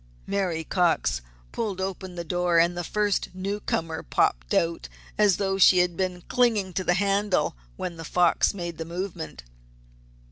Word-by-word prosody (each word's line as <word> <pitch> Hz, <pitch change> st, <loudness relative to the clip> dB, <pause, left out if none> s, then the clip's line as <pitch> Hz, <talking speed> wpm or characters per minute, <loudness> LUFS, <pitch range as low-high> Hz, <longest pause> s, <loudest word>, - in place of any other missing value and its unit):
Mary 185 Hz, -5 st, -1 dB
Cox 160 Hz, -, +1 dB, 0.3 s
pulled 205 Hz, -5 st, -3 dB
open 190 Hz, -1 st, -4 dB
the 170 Hz, -, -4 dB
door 175 Hz, 0 st, +1 dB
and 170 Hz, +1 st, +4 dB
the 175 Hz, -, -3 dB
first 205 Hz, +2 st, 0 dB
newcomer 185 Hz, -4 st, -2 dB
popped -, -, 0 dB
out 165 Hz, 0 st, 0 dB, 0.3 s
as 210 Hz, -4 st, +4 dB
though 195 Hz, -1 st, -1 dB
she 185 Hz, -, +7 dB
had 180 Hz, -1 st, +2 dB
been 180 Hz, -1 st, -2 dB
clinging 225 Hz, -7 st, +2 dB
to 185 Hz, -, -1 dB
the 175 Hz, -, +2 dB
handle 200 Hz, -, +1 dB, 0.2 s
when 170 Hz, -, -5 dB
The 165 Hz, -, -7 dB
Fox 175 Hz, +2 st, +3 dB
made 175 Hz, -4 st, -6 dB
the -, -, -2 dB
movement. 170 Hz, -, -6 dB
180 Hz, 155 wpm, -26 LUFS, 170-195 Hz, 0.3 s, she